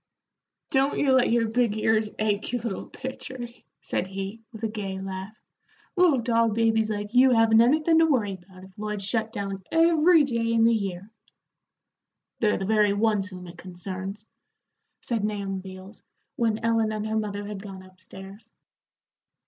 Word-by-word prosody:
"Don't 270 +1 +2
you 280 - +2
let 260 -2 +4
your 230 -1 +2
big 225 -1 +1
ears 220 0 +1
ache, 215 -1 -1
you 245 - 0
little 230 -4 -5
pitcher," 260 0 -8 0.4
said 185 - -2
he, 195 +3 -6
with 220 -1 -11
a - - +2
gay 200 -3 -5
laugh. 190 +3 -7 0.6
"Little 350 -7 +4
doll 230 -1 +2
babies 225 0 +1
like 205 0 -4
you 255 +1 +6
haven't 225 -2 +5
anythin' 310 +6 +4
to 325 - +5
worry 230 -10 +1
about 185 0 -14
if 190 0 -15
Lloyd's 210 -2 -3
shut 220 +1 -1
down 200 -3 -5
every 330 0 +5
day 230 -4 -1
in 225 -1 +3
the 230 0 +5
year." 195 -1 -3 1.3
"They're 215 -2 +2
the 195 - -3
very 210 -1 +3
ones 205 -1 +1
whom 180 -2 -10
it 170 0 -12
concerns," 185 +3 -7 0.8
said 230 -4 -2
Nahum 200 -2 -2
Beals, 190 +2 -11 0.3
when 225 -4 0
Ellen 225 -1 +2
and 215 0 -3
her 220 0 -2
mother 205 -2 -3
had 205 -1 -6
gone 195 -2 -9
up 185 0 -19
stairs. 195 +4 -12
215 Hz, 165 wpm, -26 LUFS, 195-230 Hz, 1.3 s, you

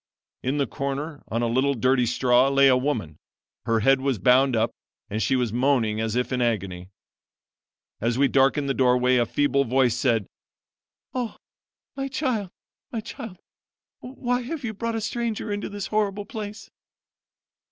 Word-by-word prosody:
In 135 +3 -1
the 140 - +2
corner 140 +4 -4
on 115 +2 -1
a - - +1
little 130 +4 +1
dirty 125 +1 +2
straw 125 +2 +3
lay 140 0 +5
a 130 - +6
woman. 125 - -2 0.5
Her 115 -1 +1
head 135 +4 +4
was 135 -3 0
bound 125 +5 +4
up, 115 +1 +1 0.4
and 110 +2 -1
she 110 +6 +2
was 125 -4 0
moaning 120 -4 +1
as 110 0 -2
if 125 +1 -1
in 125 - 0
agony. 95 -6 -2 1.1
As 115 +2 0
we 140 +1 +4
darkened 135 +2 +2
the 135 - +1
doorway 125 -1 +3
a 120 -1 +2
feeble 140 +1 +2
voice 125 -1 +2
said: 120 -5 +1 0.9
'Oh, 245 -3 -3 0.6
my 270 0 -3
child! 255 - -1 0.4
my 230 - -3
child! 225 -3 -8 0.6
why 250 -1 -2
have 275 +4 -5
you 225 -2 -3
brought 230 +2 -3
a 225 - -2
stranger 225 -1 -3
into 205 - -4
this 205 -1 -5
horrible 205 -1 -1
place?' 210 -1 -7
135 Hz, 165 wpm, -25 LUFS, -, 1.1 s, a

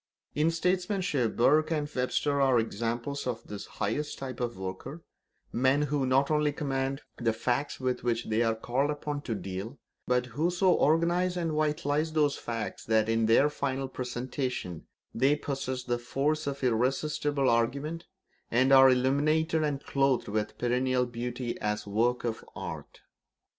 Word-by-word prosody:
In 150 +2 +2
statesmanship 180 - 0
Burke 155 +6 +4
and 150 -3 -1
Webster 140 +2 0
are 135 -2 +4
examples 115 +5 -2
of 115 -2 -3
this 105 -1 -7
highest 145 +9 -3
type 130 -3 -6
of 120 -3 -3
worker; 95 - -6 0.5
men 130 +4 +3
who 145 -2 0
not 135 +3 +3
only 150 -1 +2
command 135 -1 -2
the 115 -2 +1
facts 125 +5 -1
with 130 -1 -1
which 120 -1 0
they 110 +1 +1
are 115 -1 +2
called 125 +5 0
upon 145 -1 -3
to 115 -5 -3
deal, 100 +6 -6 0.3
but 125 0 +2
who 145 +8 -1
so 180 +1 +3
organise 175 +4 +2
and 165 -2 -1
vitalise 155 0 0
those 150 -2 +2
facts 115 -2 -5
that, 110 0 +2
in 115 0 +2
their 115 +6 +5
final 135 -2 -2
presentation, 125 - -4 0.3
they 135 +5 +3
possess 135 -3 -3
the 120 -1 -1
force 145 +5 -1
of 140 -1 -4
irresistible 135 +3 +1
argument, 140 +8 0 0.4
and 130 +3 +3
are 135 0 +9
illumined 145 +6 +2
and 150 -3 0
clothed 135 -2 +1
with 105 0 -2
perennial 125 +1 +1
beauty 120 0 -4
as 105 0 -1
works 115 +5 0
of 115 -1 -3
art. - - -7
135 Hz, 155 wpm, -29 LUFS, 120-150 Hz, 0.5 s, are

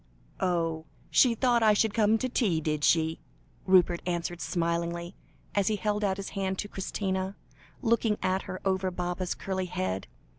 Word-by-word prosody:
"Oh! 165 -3 0 0.3
she 245 -3 +5
thought 240 0 +3
I 215 -1 +6
should 215 0 +2
come 220 0 +4
to 255 - -1
tea, 215 -10 +1
did 150 -1 -2
she?" 160 0 +3 0.5
Rupert 180 -2 +4
answered, 175 0 -2
smiling, 170 0 -1 0.4
as 200 -2 +1
he 215 - +2
held 210 0 -1
out 190 -2 +1
his 195 - -5
hand 190 -1 -2
to 205 - -3
Christina, 190 -1 -3 0.5
looking 225 -2 +2
at 185 +1 +1
her 185 - -4
over 190 -1 +1
Baba's 180 0 -3
curly 190 -1 -3
head. 95 - -3
190 Hz, 160 wpm, -29 LUFS, 170-205 Hz, 0.5 s, I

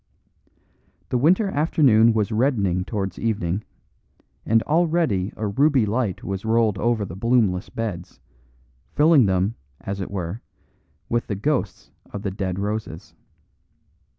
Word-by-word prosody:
The 125 - +1
winter 180 - +3
afternoon 135 - +4
was 110 -1 0
reddening 105 -7 +1
towards 95 -4 -4
evening, 100 -3 -1 0.8
and 115 0 +3
already 155 - +1
a 110 - -3
ruby 135 +4 +2
light 105 -2 -2
was 95 -1 -4
rolled 110 -3 +1
over 115 -2 0
the 85 - -8
bloomless 105 -4 +1
beds, 100 -6 -5 0.8
filling 150 -5 +5
them, 95 +3 +1 0.3
as 100 0 -5
it 95 - -5
were, 95 +2 -5 0.7
with 120 0 -1
the 105 - -2
ghosts 120 -1 -2 0.2
of 100 - -6
the 100 - -2
dead 95 -1 -3
roses. 105 -4 -4
110 Hz, 125 wpm, -23 LUFS, 95-125 Hz, 0.8 s, filling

